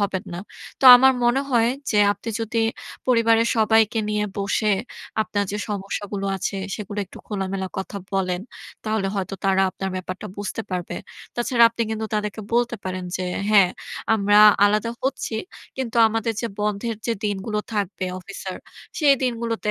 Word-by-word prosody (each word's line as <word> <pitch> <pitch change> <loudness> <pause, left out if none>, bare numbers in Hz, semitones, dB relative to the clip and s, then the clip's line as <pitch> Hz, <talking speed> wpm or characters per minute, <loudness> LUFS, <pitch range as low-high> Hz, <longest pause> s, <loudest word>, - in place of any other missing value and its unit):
হবেন 195 -2 -1
না। 175 - -5 0.4
তো - - -1
আমার 265 +1 +6
মনে 240 +3 +3
হয় 235 -2 +4 0.2
যে 210 - +2
আপনি 205 +3 -9
যদি 225 +1 -1 0.5
পরিবারের 230 -1 +4
সবাইকে 220 0 +3
নিয়ে 210 0 0
বসে, 200 +2 +1 0.5
আপনার 205 -1 -1
যে 210 - -2
সমস্যাগুলো 200 0 -4
আছে 195 +1 -3 0.2
সেগুলো 205 -1 -6
একটু - - -13
খোলামেলা 190 -2 -3
কথা 200 +1 -6
বলেন। 185 -2 0 0.5
তাহলে 215 -2 0
হয়তো 195 -1 -3
তারা 195 0 +3
আপনার 190 +1 -4
ব্যাপারটা 185 0 -6
বুঝতে 205 +2 -4
পারবে। 180 -1 -3 0.4
তাছাড়া 240 0 +3
আপনি 230 0 -2
কিন্তু 220 0 -2
তাদেরকে 210 0 -2
বলতে 240 0 +1
পারেন 185 -1 -4
যে 185 - -3 0.3
হ্যাঁ, 200 -4 +6 0.4
আমরা 205 -1 +4 0.3
আলাদা 210 +2 +2
হচ্ছি। 260 -3 -2 0.4
কিন্তু 255 -3 -3
আমাদের 225 +1 -1
যে 235 - -1
বন্ধের 210 +2 -1 0.3
দিনগুলো 205 +1 -2 0.2
থাকবে 200 -2 -2 0.2
অফিসের। 190 0 -7 0.4
সেই 290 -3 +5
দিনগুলোতে 230 -3 -1
210 Hz, 150 wpm, -23 LUFS, 195-230 Hz, 0.5 s, আমার